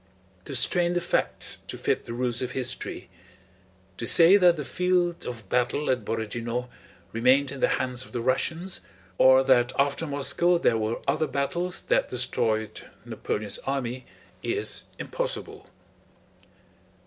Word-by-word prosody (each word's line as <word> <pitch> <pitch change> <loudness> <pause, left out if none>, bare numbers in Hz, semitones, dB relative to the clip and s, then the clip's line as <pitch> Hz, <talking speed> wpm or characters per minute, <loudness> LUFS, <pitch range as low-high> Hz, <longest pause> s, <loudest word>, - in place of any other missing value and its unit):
To - - -6
strain 175 -1 +2
the 175 - +1
facts 175 - -1
to - - -6
fit - - -1
the 115 - -6
rules 120 -1 -1
of 130 0 -3
history: 130 -1 -3 0.9
to 115 - -3
say 170 - +7
that 180 -4 +5
the 150 - -4
field 180 +1 0
of 115 -5 -7
battle 125 +6 0
at 125 -4 -1
Borodinó 115 +3 -3 0.4
remained 130 +5 +3
in 140 - -7
the - - +3
hands 125 -1 -3
of - - -15
the 120 - -3
Russians, 160 +9 -1 0.4
or 130 0 +7
that 125 -2 +3
after 140 +3 +1
Moscow 150 +5 +1
there 120 -8 +2
were 110 +1 -2
other 155 +3 +1
battles 175 +6 -2
that - - +1
destroyed 110 -1 0 0.2
Napoleon's 105 -1 -3
army, 130 -2 -4 0.3
is 415 - -2
impossible. - - -4
130 Hz, 140 wpm, -26 LUFS, 120-170 Hz, 0.9 s, say